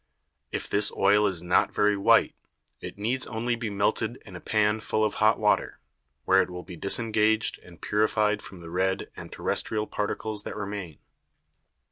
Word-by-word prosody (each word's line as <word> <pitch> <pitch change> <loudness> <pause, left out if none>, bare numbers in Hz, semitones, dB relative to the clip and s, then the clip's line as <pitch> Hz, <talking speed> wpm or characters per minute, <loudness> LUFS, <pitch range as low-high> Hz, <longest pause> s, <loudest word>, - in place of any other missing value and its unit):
If - - -3
this 100 0 +2
Oil 105 +1 +4
is 90 -3 -4
not 90 0 +2
very 105 0 +3
white, 100 - +4 0.5
it - - -8
needs 120 +6 -1
only 120 +2 -1
be 115 -2 -4
melted 100 0 0
in - - -11
a - - -6
Pan 105 0 +1
full 110 0 0
of 105 - -1
hot 110 +1 +5
Water, 105 -1 +1 0.5
where 95 0 +5
it - - -3
will 90 0 -7
be 90 - -10
disengaged 110 +4 +1
and 85 -3 -16
purified 105 0 +1
from 95 -3 -11
the 85 -1 -10
red 95 +2 -1
and - - -10
terrestrial 110 -1 -1
Particles 105 0 -3
that - - -7
remain. 100 -6 -5
105 Hz, 170 wpm, -27 LUFS, 95-110 Hz, 0.5 s, hot